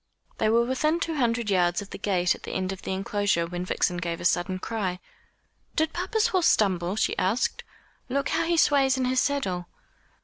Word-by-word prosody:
They 215 - +2
were 235 +1 +3
within 305 +6 +1
two 330 - -2
hundred 235 -6 0
yards 175 -2 +2
of 205 -1 -8
the - - -7
gate 180 -3 +1
at - - -12
the - - -7
end 185 0 -1
of 190 - -7
the - - -5
enclosure, 195 -2 0
when 175 +1 -5
Vixen 180 -1 0
gave 170 -1 -3
a - - -6
sudden 180 +1 +1
cry: 185 -3 -3 0.8
"Did 315 0 +1
papa's 430 +6 0
horse 370 -6 +2
stumble?" 185 -3 +2
she 220 - 0
asked; 200 +7 0 0.5
"look 275 +3 -1
how - - +1
he 340 0 +1
sways 275 -4 +4
in 260 - 0
his 255 0 +2
saddle." 190 -13 -1
210 Hz, 200 wpm, -26 LUFS, 180-275 Hz, 0.8 s, sways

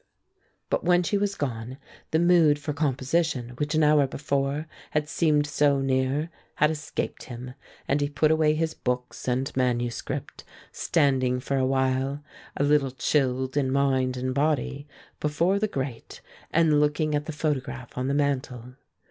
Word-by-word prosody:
But - - +1
when 175 0 +4
she 205 - -1
was 200 0 0
gone, 125 -2 -4 0.3
the 160 - +2
mood 170 -3 +5
for 145 +1 -4
composition 140 -1 0
which 150 +2 -1
an 155 - +3
hour 150 -2 +5
before 140 +2 -1 0.2
had 150 0 -1
seemed 150 -2 +2
so 145 -1 +2
near 135 +4 0 0.2
had 150 +1 +3
escaped 150 -1 -4
him, 125 0 -8 0.3
and 145 +2 +1
he 145 - 0
put 150 +2 +2
away 155 -1 +3
his 160 0 -1
books 125 -2 -4
and 130 +2 -1
manuscript, 120 -2 -2 0.3
standing 130 -6 +1
for 140 +2 -2
a 130 -1 +2
while, 130 +2 0 0.3
a - - +1
little 145 -1 +3
chilled 130 -1 0
in 140 -3 +1
mind 130 -2 +1
and 130 +1 -2
body, 145 0 0 0.3
before 170 +6 +1
the 215 - +1
grate 135 - -5 0.3
and 160 -3 +3
looking 150 +1 +1
at 145 0 -1
the - - -2
photograph 135 -5 -3
on 125 +1 -2
the 140 - 0
mantel. 130 -4 -1
140 Hz, 155 wpm, -26 LUFS, 130-150 Hz, 0.3 s, mood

